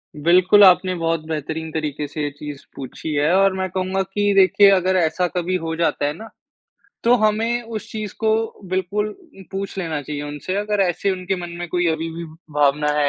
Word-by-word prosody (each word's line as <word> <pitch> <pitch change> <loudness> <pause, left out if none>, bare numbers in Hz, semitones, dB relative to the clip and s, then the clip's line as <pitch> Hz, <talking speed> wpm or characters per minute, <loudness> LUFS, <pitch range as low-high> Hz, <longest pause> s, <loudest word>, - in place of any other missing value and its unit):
बिल्कुल, 180 +6 +5
आपने 185 -1 +5
बहुत 165 -2 -1
बेहतरीन 160 +1 -4
तरीके 150 -2 -3
से 150 +2 -6
ये 145 - -1
चीज़ 145 -1 -7
पूछी 135 +3 -6
है। 150 +3 +2
और 195 0 +4
मैं 190 0 -2
कहूँगा 185 +1 -1
कि 205 +2 0
देखिए 195 +1 +6
अगर 185 -1 +2
ऐसा 175 +1 +1
कभी 180 +1 0
हो 165 0 -2
जाता 165 -3 0
है 145 - 0
ना, 220 +8 -10 0.8
तो 235 +1 +6
हमें 225 +2 +1
उस 225 -1 -7
चीज़ 215 -2 -5
को 220 -1 +2 0.4
बिल्कुल 190 +3 -1 0.4
पूछ 195 0 -5
लेना 160 -5 -2
चाहिए 145 0 -5
उनसे, 145 +5 -5
अगर 210 0 0
ऐसे 190 +1 +1
उनके 185 0 -2
मन 175 -1 -6
में 175 - -4
कोई 175 +1 0
अभी 160 +1 -3
भी 170 +1 -6 0.3
भावना 150 0 +2
है 145 -1 +3
180 Hz, 195 wpm, -21 LUFS, 155-195 Hz, 0.8 s, देखिए